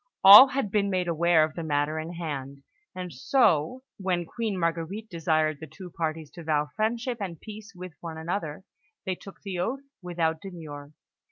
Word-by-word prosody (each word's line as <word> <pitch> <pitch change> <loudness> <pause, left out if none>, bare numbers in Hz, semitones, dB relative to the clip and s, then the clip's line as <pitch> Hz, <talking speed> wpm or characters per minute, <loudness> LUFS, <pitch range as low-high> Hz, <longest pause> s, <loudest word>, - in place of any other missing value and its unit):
All 205 +7 +12
had 265 -7 -2
been 200 -1 +1
made 185 -2 0
aware 170 -1 +3
of 155 0 -2
the 170 - -5
matter 150 0 0
in 160 +2 -6
hand; 140 -5 -6 0.3
and 180 -2 -6
so, 170 - +2
when 180 -3 -1
Queen 220 +2 -3
Marguerite 170 +6 -2
desired 155 -3 0
the 160 - -8
two 180 +4 -11
parties 160 -2 -4
to 170 - -10
vow 150 -2 0
friendship 235 +2 -1
and 175 -5 -5
peace 215 0 -10
with 180 -1 -9
one 165 -2 -7
another, 160 0 -4 0.4
they 190 - 0
took 195 +2 -12
the 190 -3 -4
oath 245 +10 -2 0.2
without 165 -3 -1
demur. 150 -6 -9
170 Hz, 175 wpm, -27 LUFS, 155-200 Hz, 0.4 s, All